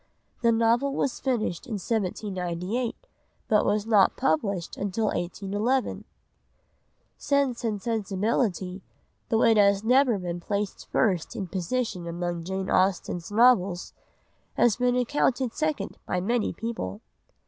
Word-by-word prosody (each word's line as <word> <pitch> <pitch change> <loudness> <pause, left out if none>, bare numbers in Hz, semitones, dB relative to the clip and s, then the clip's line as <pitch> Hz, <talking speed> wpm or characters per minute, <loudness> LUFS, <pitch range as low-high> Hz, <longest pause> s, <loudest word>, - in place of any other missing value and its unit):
The 235 -1 +4
novel 230 +5 +2
was 270 - -1
finished 230 -10 -1
in 235 - -5
1798 200 +1 -2 0.5
but 210 -1 +2
not 210 -4 +4
published 170 +3 0
until 205 +2 -2
1811. 205 +8 -1 1.1
Sense 280 -4 +1
and 215 -3 -1
Sensibility, 200 -3 -1 0.5
though 225 0 +3
it 225 -1 +5
has 200 0 +4
never 250 -1 +4
been 175 -2 -4
placed 200 +3 -3
first 185 +1 +1
in 205 -4 -3
position 185 0 -2
among 170 0 -3
Jane 190 +1 -3
Austen's 185 -1 +1
novels, 205 -6 +3 0.6
has 235 -4 +4
been 250 0 +2
accounted 250 -1 +1
second 310 -1 -2
by 180 - 0
many 230 +5 0
people. 110 - -5
210 Hz, 115 wpm, -26 LUFS, 185-235 Hz, 1.1 s, it